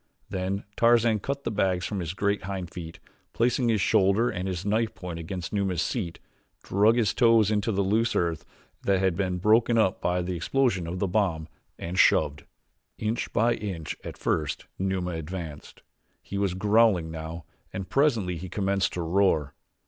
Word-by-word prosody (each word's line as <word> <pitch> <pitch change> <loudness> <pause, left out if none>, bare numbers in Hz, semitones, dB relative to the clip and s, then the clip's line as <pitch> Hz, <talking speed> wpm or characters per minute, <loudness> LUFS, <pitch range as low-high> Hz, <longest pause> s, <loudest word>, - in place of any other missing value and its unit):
Then 95 +2 -2
Tarzan 115 -2 +4
cut 140 +6 -4
the 115 - -2
bags 95 -3 0
from 100 - -3
the 85 -3 -3
great 100 0 0
hind 95 -3 -5
feet, 85 -1 -8 0.3
placed 120 +2 +2
his 115 -5 +2
shoulder 100 +6 +3
and 90 +1 -4
his 90 0 -4
knife 110 +2 0
point 90 -2 -6
against 85 +2 -5
Numa's 95 -4 0
seat, 95 -9 -3 0.5
dug 105 +4 +4
his 115 -5 +2
toes 115 -4 +4
into 105 +1 +1
the 100 -1 +1
loose 110 +4 +1
earth 85 -2 0 0.4
that 100 -1 +2
had 95 -2 +1
been 90 -1 -1
broken 110 +5 +3
up 100 -5 +2
by 90 0 0
the 90 0 -3
explosion 90 -1 0
of 90 +2 -4
the 100 - 0
bomb, 90 -6 0 0.3
and 90 +3 -4
shoved. 75 0 +3 0.5
Inch 110 +2 -2
by 120 +2 +3
inch 95 -8 -5
at - - -7
first 75 -2 -1
Numa 95 -1 -1
advanced. 80 -2 -7 0.4
He 100 - -4
was 100 -3 0
growling 105 -4 +3
now 80 0 -7 0.3
and 95 -1 -5
presently 110 - +1
he 90 +3 -7
commenced 95 0 0
to 90 - -3
roar. 80 -4 +2
95 Hz, 170 wpm, -27 LUFS, 90-110 Hz, 0.5 s, Tarzan